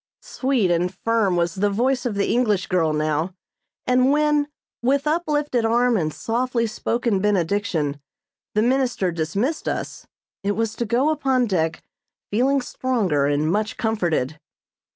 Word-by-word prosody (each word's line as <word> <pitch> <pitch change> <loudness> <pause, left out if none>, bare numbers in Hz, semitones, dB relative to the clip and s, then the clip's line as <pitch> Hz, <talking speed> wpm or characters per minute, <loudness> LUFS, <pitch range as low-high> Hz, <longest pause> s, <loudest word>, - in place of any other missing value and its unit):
Sweet 255 -9 0
and 175 +1 +1
firm 205 -1 +1
was 170 -1 +1
the 205 +3 +1
voice 250 +5 0
of 220 - -3
the 200 - 0
English 215 -6 +1
girl 165 -4 +1
now, 155 +4 -1 0.5
and 255 +1 +3
when, 300 0 +2 0.3
with 275 +4 +1
uplifted 300 -5 0
arm 240 +2 +3
and 160 -6 0
softly 235 +5 -1
spoken 230 -1 -1
benediction, 180 -7 0 0.5
the 215 - +3
minister 245 -7 +1
dismissed 195 - -2
us, - - -4 0.3
it 200 +1 0
was 225 0 -1
to 235 - -1
go 245 +7 +2
upon 270 -4 +1
deck 165 -6 -1 0.5
feeling 265 +6 +2
stronger 205 - 0
and 145 +2 +1
much 210 +3 -1
comforted. 170 - -1
220 Hz, 140 wpm, -22 LUFS, 175-255 Hz, 0.5 s, and